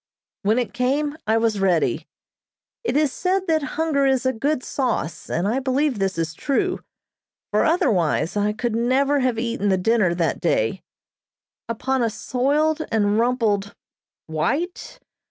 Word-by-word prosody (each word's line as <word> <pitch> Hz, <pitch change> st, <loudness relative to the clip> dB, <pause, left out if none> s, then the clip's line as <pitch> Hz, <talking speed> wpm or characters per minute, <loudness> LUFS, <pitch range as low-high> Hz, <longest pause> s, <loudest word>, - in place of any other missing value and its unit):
When 215 Hz, +3 st, +2 dB
it 245 Hz, -2 st, -1 dB
came 285 Hz, +4 st, 0 dB
I 220 Hz, +1 st, +3 dB
was 225 Hz, -2 st, +1 dB
ready. 185 Hz, -4 st, +1 dB, 0.8 s
It 370 Hz, -, 0 dB
is 300 Hz, -3 st, +2 dB
said 375 Hz, +1 st, 0 dB
that 320 Hz, -2 st, +2 dB, 0.2 s
hunger 305 Hz, -4 st, +2 dB
is 265 Hz, -1 st, +1 dB
a 260 Hz, -, +2 dB
good 270 Hz, +3 st, -1 dB
sauce, 245 Hz, -, -2 dB
and 175 Hz, +4 st, 0 dB
I 235 Hz, +5 st, +1 dB
believe 270 Hz, -2 st, 0 dB
this 195 Hz, -2 st, -1 dB
is 165 Hz, -1 st, -2 dB
true, 360 Hz, -, -1 dB, 0.7 s
for -, -, +3 dB
otherwise 205 Hz, -, +1 dB
I 205 Hz, 0 st, +1 dB
could 230 Hz, +1 st, -2 dB
never 270 Hz, +5 st, +2 dB
have 255 Hz, -3 st, +1 dB
eaten 230 Hz, -3 st, -1 dB
the 190 Hz, -, +3 dB
dinner 185 Hz, -2 st, +2 dB
that 170 Hz, -2 st, -1 dB
day. -, -, 0 dB, 0.9 s
Upon 260 Hz, +3 st, -1 dB
a 230 Hz, -, +2 dB
soiled 290 Hz, +8 st, 0 dB
and 210 Hz, -1 st, +2 dB
rumpled 225 Hz, -5 st, 0 dB, 0.5 s
white 275 Hz, -, -2 dB
245 Hz, 150 wpm, -22 LUFS, 205-280 Hz, 0.9 s, I